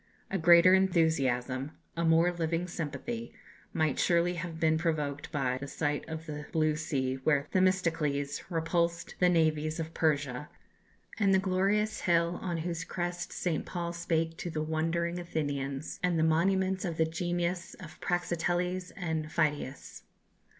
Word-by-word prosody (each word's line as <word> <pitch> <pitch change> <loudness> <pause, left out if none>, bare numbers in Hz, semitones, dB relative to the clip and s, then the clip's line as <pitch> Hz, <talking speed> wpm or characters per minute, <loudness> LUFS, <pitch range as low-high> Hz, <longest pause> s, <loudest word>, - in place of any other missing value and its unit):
A 195 - 0
greater 170 +2 +7
enthusiasm, 150 -7 +2 0.2
a 170 - -1
more 165 +2 +4
living 170 0 -1
sympathy, 170 - -5 0.4
might 155 -4 0
surely 175 0 +3
have 170 -1 -5
been 160 -1 +3
provoked 150 -4 -2
by 130 -4 0
the 140 - -6
sight 145 +2 -2
of 160 0 -5
the 150 -2 -6
blue 155 -1 +2
sea 135 -4 -1
where 145 -2 +3
Themistocles 165 -7 +1
repulsed 170 0 0
the 180 - +5
navies 155 -1 +1
of 160 0 -4
Persia, 145 -3 0 0.7
and 195 -2 +4
the - - +6
glorious 195 +3 +1
hill 170 0 +2
on 175 -3 -2
whose 170 -2 -2
crest 175 0 -4
St. 170 -4 -1
Paul 170 -1 -4
spake 165 -1 -1
to 175 - -3
the 155 -1 -2
wondering 165 +2 -1
Athenians, 145 -4 -3
and 180 -2 +1
the 160 - +3
monuments 190 +4 +2
of 170 -4 -3
the 160 - +3
genius 175 +2 -2
of 165 -5 -12
Praxiteles 175 +1 -1
and 160 -4 -2
Phidias. 150 -4 -2
165 Hz, 145 wpm, -30 LUFS, 155-175 Hz, 0.7 s, greater